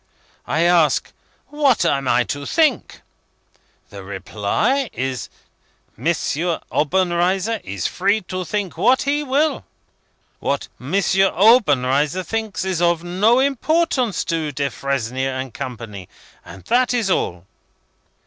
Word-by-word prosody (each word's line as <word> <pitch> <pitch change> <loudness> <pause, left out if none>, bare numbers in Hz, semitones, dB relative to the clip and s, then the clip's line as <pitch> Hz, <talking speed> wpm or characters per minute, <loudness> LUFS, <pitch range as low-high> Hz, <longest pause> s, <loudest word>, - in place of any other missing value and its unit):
I 160 - 0
ask, 170 -3 +3 0.4
what 280 - +2
am 140 -5 0
I 125 - +3
to 140 +3 -5
think? 310 -7 +1 0.9
The 100 -1 -9
reply 105 - -1
is, 130 -1 -3 0.7
'M. - - -5 0.6
Obenreizer 185 +6 +1
is 95 -1 -5
free 200 +4 +1
to 185 0 -5
think 200 0 -3
what 260 +1 +3
he 290 +1 0
will. 295 +2 0 0.8
What - - -2
M. - - -8
Obenreizer 185 - +3
thinks, 220 -2 -3
is 185 -3 -1
of 170 -1 +2
no 195 +7 +2
importance 275 - +1
to 160 -3 -2
Defresnier 135 -1 -2
and 130 -3 -6
Company.' 110 -7 -7 0.3
And 95 - -12
that 250 +1 +2
is 220 -6 0
all." 90 - -1
180 Hz, 115 wpm, -20 LUFS, -, 0.9 s, ask